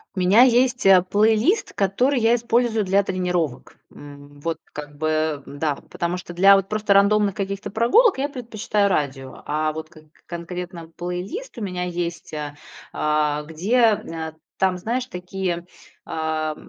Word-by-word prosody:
У - - -3
меня 185 +6 +5
есть, 250 -1 +3
э, 190 -2 +8
плейлист, 220 - +2
который 245 +8 +1
я 225 0 +4
использую 235 -1 +1
для 195 +2 +3
тренировок, 180 -8 -2
м. 145 0 -13
Вот 165 -1 -1 0.2
как 145 -1 -8
бы, 155 -1 -1
да, 145 +1 -2 0.2
потому 175 +1 -2
что 175 -1 -9
для 195 +3 +7
вот 195 0 0
просто 210 -1 +1
рандомных 200 0 +4
каких-то 195 0 -4
прогулок 315 - +4
я 275 +2 0
предпочитаю 220 -5 -1
радио, 135 -6 -3
а 155 +1 0
вот 160 0 -7
к 155 - -16 0.2
конкретно 170 0 -7
плейлист 180 - -5
у - - -6
меня 180 -3 -3
есть, 175 -2 -4
а, 150 -1 -5 0.4
а, 150 -1 0
где, 165 +9 -2
э, 165 -8 +1 0.2
там, 190 -1 +1
знаешь, 240 +6 -2
такие, 180 -3 -4 0.4
а, 155 -1 -2
180 Hz, 150 wpm, -22 LUFS, 160-215 Hz, 0.4 s, э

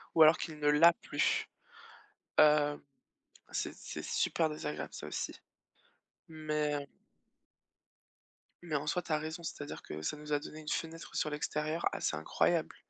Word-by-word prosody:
ou 160 - +9
alors 155 +1 +8
qu'il 160 -3 -5
ne 150 - +1
l'a 165 +3 +7
plus, - - 0 0.9
heu, 150 -1 +5 0.7
c'est - - -2
c'est - - -7
super 165 -2 +1
désagréable 80 - -4
ça - - -6
aussi. - - -3 1.0
Mais 150 -2 -1 1.7
Mais 160 -3 -1
en 145 +1 -3
soi, 180 +3 0
tu 160 - -4
as 155 - +3
raison, 160 +3 -5
c'est-à-dire 145 -3 -6
que 75 - -7
ça 80 - -2
nous 150 0 -7
a 145 - +4
donné 155 +1 -9
une 155 - -11
fenêtre 165 +1 -3
sur 155 - +1
l'extérieur 150 +2 -2
assez - - -1
incroyable 75 - +1
150 Hz, 150 wpm, -33 LUFS, 150-160 Hz, 1.7 s, ou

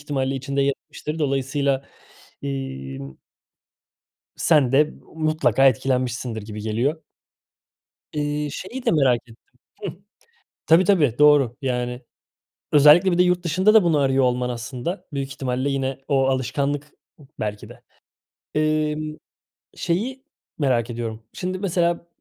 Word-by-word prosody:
ihtimalle 135 -2 -2
içinde 140 +1 -1
yer 140 - +3
etmiştir. 155 +2 -6
Dolayısıyla, 140 -1 0 0.6
imm 70 - -5 1.2
sen 145 -6 +3
de 150 +3 +3 0.2
mutlaka 155 -3 +2
etkilenmişsindir 125 -2 0
gibi 105 0 -7
geliyor. 120 +9 -1 1.1
İii, 150 0 -2
şeyi 245 - -7
de - - +3
merak 135 -6 +3
ettim. 115 -2 -17 0.5
Hıh. 195 - -2 0.7
Tabii, 165 +3 +6
tabii, 155 - +3
doğru. 145 -4 +5
Yani, 125 -1 -2 0.7
özellikle 150 +6 +7
bir 175 - +1
de 180 - +6
yurt 180 0 +1
dışında 185 +6 +3
da 220 -4 +7
bunu 165 -3 +3
arıyor 135 -1 +2
olman 125 0 +1
aslında 125 - -5
büyük 135 -1 -3
ihtimalle 130 +1 -2
yine 135 -1 -2
o 135 -2 +2
alışkanlık 140 +3 -1 0.5
belki 105 -1 -4
de. - - -14 0.7
Imm, 155 0 0 0.6
şeyi 240 +10 -2 0.4
merak 125 -5 +1
ediyorum: 115 -1 -5
Şimdi 185 0 -4
mesela 170 -3 0
140 Hz, 120 wpm, -23 LUFS, 125-155 Hz, 1.2 s, özellikle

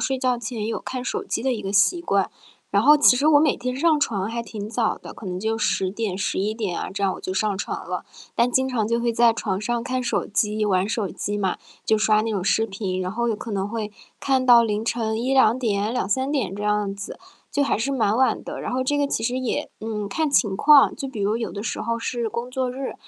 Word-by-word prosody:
睡 265 -1 0
觉 255 -1 +1
前 225 -2 -4
有 225 - -3
看 255 -1 -5
手 - - -2
机 - - -3
的 265 - +1
一 230 - -4
个 195 - -4
习 205 - +3
惯， 200 - +1 0.4
然 200 +1 +3
后 300 +3 +7
其 285 -4 +6
实 290 +4 +2
我 290 -2 +7
每 300 -2 +3
天 250 +1 -3
上 310 +1 +3
床 205 -7 0
还 235 +1 -3
挺 210 -2 -7
早 225 0 0
的， - - -10
可 220 - -12
能 180 -1 -3
就 220 +2 -1
10 190 -3 0
点， 205 -2 -3
11 200 +1 -1
点 210 -6 -3
啊， - - -4
这 200 0 -2
样， 190 - +2
我 - - -9
就 185 - -4
上 200 +1 0
床 - - -5
了。 - - -3 0.3
但 235 +1 +2
经 260 +1 +2
常 225 -4 -1
就 235 - +1
会 235 0 0
在 235 0 +5
床 200 -4 -2
上 235 +1 -2
看 255 0 -1
手 245 - -1
机、 210 +1 0
玩 190 -1 +1
手 215 -3 -1
机 205 +3 -4
嘛， 190 -3 -1 0.3
就 220 - +3
刷 215 0 +3
那 225 - -2
种 195 -3 -1
视 225 +3 +2
频， 195 -3 -3
然 185 0 -3
后 235 +2 -1
有 220 - 0
可 225 +1 -7
能 195 0 -1
会 215 -1 -4 0.3
看 265 -2 +1
到 240 -2 +7
凌 215 0 -1
晨 225 -1 -1
1-2 255 -3 +4
点， 215 -3 0
2-3 255 +4 -1
点 230 -10 -1
这 205 - -5
样 210 -1 +1
子， 200 0 -8 0.3
就 285 - +2
还 280 - +1
是 230 +5 -1
蛮 220 -4 +1
晚 260 0 +2
的。 - - -6
然 - - -4
后 255 - 0
这 290 +3 +1
个 285 - +2
其 225 - -2
实 250 +2 0
也， 255 -2 -2
嗯， 215 -2 -4
看 315 +9 0
情 210 -8 +2
况， 285 +4 +6
就 275 - -4
比 225 -5 -6
如 205 +2 +1
有 230 - -3
的 200 - -5
时 215 - -3
候 230 0 -1
是 235 0 -2
工 235 +3 -5
作 260 0 -1
日， 265 +1 -5
225 Hz, 265 characters per minute, -23 LUFS, 205-250 Hz, 0.4 s, 后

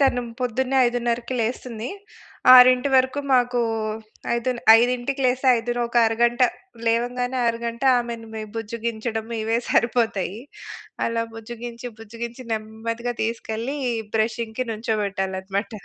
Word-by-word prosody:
తను 265 -3 +3 0.2
పొద్దున్నే 255 +2 0
5:30కి 240 0 0 0.2
లేస్తుంది. 230 0 -3 0.6
6:00కి 255 +2 +7
వరకు 260 +2 +2
మాకు 245 -1 +3 0.7
ఐదులె 240 +1 -2 0.2
5:00కి 250 +3 0
లేస్తే 255 +2 0
ఐదోనొక 240 +1 -2
అరగంట, 240 +2 +1 0.5
లేవంగానే 245 +2 0
అరగంట 235 +1 -3 0.2
ఆమెని 235 -2 -5
మేం 215 -1 -5
బుజ్జిగించడం 225 0 -3 0.2
ఇవే 225 +1 +1
సరిపోతాయి. 225 -3 +1 0.7
అలా 230 0 -1
బుజ్జిగించి, 235 +1 -8
బుజ్జిగించి 235 +3 -7
నెమ్మదిగా 225 +2 -4
తీసుకెళ్ళి 230 +4 -3 0.4
బ్రషింగ్‌కి 225 +2 -1
నించోబెట్టాలన్నమాట. 200 -3 -2
235 Hz, 100 wpm, -23 LUFS, 225-245 Hz, 0.7 s, 6:00కి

